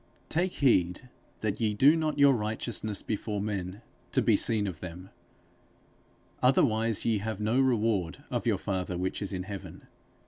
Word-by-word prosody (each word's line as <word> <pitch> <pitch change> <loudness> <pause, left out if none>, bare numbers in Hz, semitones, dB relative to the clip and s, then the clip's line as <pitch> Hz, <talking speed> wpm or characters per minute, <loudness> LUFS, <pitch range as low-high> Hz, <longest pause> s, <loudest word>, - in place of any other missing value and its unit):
_ - - -35
Take 180 +3 0
heed 120 - +2 0.3
that 110 +1 -2
ye 105 -2 +1
do 140 +9 +6
not 155 -2 -1
your 140 -1 +6
righteousness 110 -2 -2
before 105 -1 -3
men 100 0 -4 0.3
to - - +3
be - - +4
seen 110 -3 0
of 90 -6 -5
them; 90 +2 -9 1.3
otherwise 115 -4 +2
ye 110 -3 +2
have 110 0 -4
no 110 +4 +1
reward 110 -9 +1
of - - -2
your - - +3
father 90 -2 -3
which 95 +3 -2
is 100 - -3
in 90 -2 -3
heaven.... 100 0 -8
105 Hz, 165 wpm, -29 LUFS, 95-120 Hz, 1.3 s, do